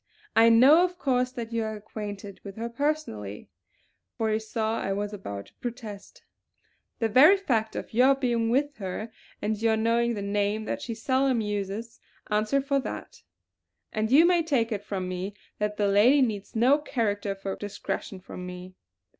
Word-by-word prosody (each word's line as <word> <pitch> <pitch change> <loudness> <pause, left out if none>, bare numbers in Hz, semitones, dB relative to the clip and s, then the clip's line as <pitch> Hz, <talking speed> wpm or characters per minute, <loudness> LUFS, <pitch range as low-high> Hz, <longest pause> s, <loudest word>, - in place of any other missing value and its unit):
I 225 +1 +7
know 265 +9 +7
of 360 0 -1
course 255 -5 +1
that 230 -2 -6
you 230 -1 0
are 220 0 -3
acquainted 205 -2 -7
with 195 -1 -8
her 230 +1 -4
personally," 235 - -3 0.7
for 220 -1 0
he 215 - +1
saw 220 0 -2
I 195 - -1
was 205 +1 -3
about 100 - -6
to - - -21
protest, 225 -5 -7 0.7
"the 225 - +1
very 290 - +7
fact 230 - -1
of - - -6
your 255 +4 +5
being 240 -4 0
with 280 +4 +1
her 205 +3 -5 0.3
and 215 0 -1
your 225 -1 +3
knowing 230 +1 +1
the 200 - -4
name 205 +1 0
that - - -3
she 230 - -4
seldom 260 +1 +1
uses 210 +2 -4 0.3
answer 215 +6 +2
for 275 0 +1
that; - - -7 0.7
and 215 +1 -1
you 305 +5 +7
may 350 -1 +4
take 265 -8 0
it 205 -2 -3
from 190 -3 -3
me 185 +2 -4 0.2
that 210 0 -1
the 205 - +2
lady 235 +8 +5
needs 210 -4 -3
no 255 +6 +4
character 205 -8 -1
for 195 0 -4
discretion 205 -1 -5
from 180 0 -9
me. 180 0 -8
220 Hz, 175 wpm, -27 LUFS, 205-250 Hz, 0.7 s, I